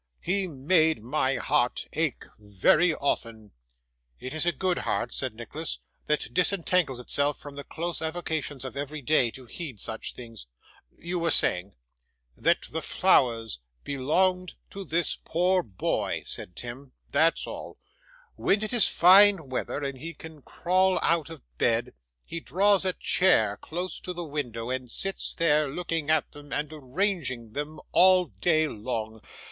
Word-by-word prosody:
He 190 +2 0
made 160 -2 +2
my 130 +1 0
heart 135 -4 0
ache 155 -5 -1 0.2
very 105 - +3
often.' 115 -6 -3 0.7
'It 130 - -6
is 155 +2 0
a - - +5
good 180 +4 -1
heart,' 120 +1 -1
said 130 -5 -3
Nicholas, 150 +8 -4 0.3
'that 150 -6 0
disentangles 180 -6 +1
itself 145 +3 0
from 145 - -10
the 140 - -7
close 170 +3 -4
avocations 160 -4 -3
of 130 - -7
every 145 +1 -5
day, 130 -3 +3
to 130 +2 -12
heed 130 - -7
such 110 - -4
things. 115 - -10 0.5
You 175 +2 -3
were 165 0 0
saying 90 - +3 0.3
' - - -46
'That - - +2
the - - -3
flowers 115 - +2 0.2
belonged 180 +7 0 0.2
to 195 - -6
this 170 -1 0
poor 180 +3 +2
boy,' 100 - -2
said 90 - -4
Tim; 130 +2 -8 0.2
'that's 165 +1 +3
all. - - -8 0.6
When 200 +2 +1
it 215 - -2
is 240 -4 +4
fine 190 -3 +6
weather, 130 +3 -3
and 140 -2 -4
he 165 +3 -7
can 160 -2 -12
crawl 185 +5 +1
out 165 -2 +1
of 160 -5 -10 0.2
bed, 120 +1 +1 0.3
he 165 - -5
draws 195 +3 +3
a 185 - +1
chair 110 - +3
close 180 - -5
to 180 - -6
the 175 -1 -5
window, 125 -6 -4
and 130 -1 -3
sits 195 +10 -2
there, 155 -3 +3
looking 165 0 -3
at 155 -1 +2
them 145 -1 -11
and 150 +1 -2
arranging 145 - -2
them, 150 +2 -5
all 185 0 +6
day 155 -2 +1
long. 110 -2 -5
150 Hz, 155 wpm, -27 LUFS, 125-175 Hz, 0.7 s, fine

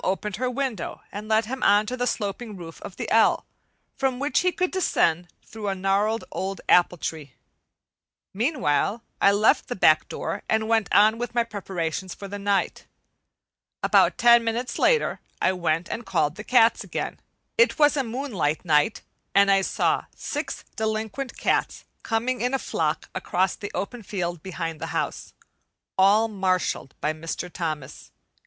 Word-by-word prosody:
opened 195 +1 -2
her 255 +2 -1
window 250 -8 -3
and 210 +1 -7
let 220 0 +2
him 260 +4 -5
on 205 +1 +4
to 250 - -3
the 245 0 -1
sloping 210 0 -3
roof 165 -2 -10
of 185 - -9
the - - -5
"L," 225 0 +4 0.5
from 265 -2 0
which 285 +3 +1
he 365 - +2
could 365 0 -1
descend 175 - +1 0.2
through 220 -2 -7
a 195 - 0
gnarled 200 +4 +1
old 195 +1 -3
apple 180 0 +4
tree. 150 -5 -6 1.0
Meanwhile 225 - 0 0.2
I 200 - +6
left 205 +2 +3
the 245 - -3
back 155 -4 +4
door - - -4
and 220 0 +1
went 225 -2 +1
on 215 +2 +5
with 240 0 -4
my 235 - +3
preparations 190 -5 -4
for 200 - -8
the 205 +1 -6
night. 200 -1 -1 1.0
About - - +4
ten 235 -1 +6
minutes 230 +2 -2
later 475 -2 +2 0.2
I - - +3
went 170 -2 -1
and 240 - -4
called 150 -9 0
the 210 - -7
cats 230 -1 +4
again. - - -4 0.4
It 475 +1 +4
was 295 -1 +5
a 275 - +1
moonlight 225 - -2
night 150 +5 +2 0.3
and 200 0 +6
I 195 0 +4
saw - - 0
six - - -5
delinquent 220 +4 -3
cats - - 0 0.2
coming 240 +3 -1
in 250 +2 +1
a - - +2
flock - - -2
across 185 +1 0
the 205 - -6
open 240 +4 -4
field 175 -5 -4
behind 165 -4 -5
the 165 - -3
house, - - -4 0.6
all 205 +4 +5
marshalled 185 -9 -1
by 150 - 0
Mr. 165 +2 -6
Thomas. 155 -6 -5
205 Hz, 165 wpm, -25 LUFS, 180-235 Hz, 1.0 s, I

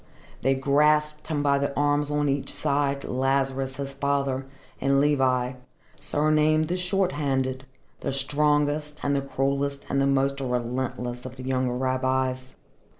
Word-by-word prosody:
They 135 0 +2
grasped 150 +2 +2
him 150 -3 -1
by 140 -1 +3
the 140 0 0
arms 145 0 +2
on 150 0 +1
each 140 0 -1
side, 140 -1 0
Lazarus 135 0 0
his 140 0 -5
father, 140 -1 -1 0.3
and 135 +1 +3
Levi, 130 -3 +2 0.5
surnamed 155 +1 +2
the 180 - 0
Short 185 +1 +1
handed, 130 -2 -1 0.3
the - - -2
strongest 150 +2 0
and 140 0 +1
the 140 - +1
cruellest 140 +1 -1
and 140 - +2
the 135 - +3
most 140 0 +1
relentless 125 0 -2
of 130 0 -8
the 130 - -9
younger 130 -1 0
rabbis. 130 0 -1
140 Hz, 145 wpm, -26 LUFS, 130-145 Hz, 0.5 s, by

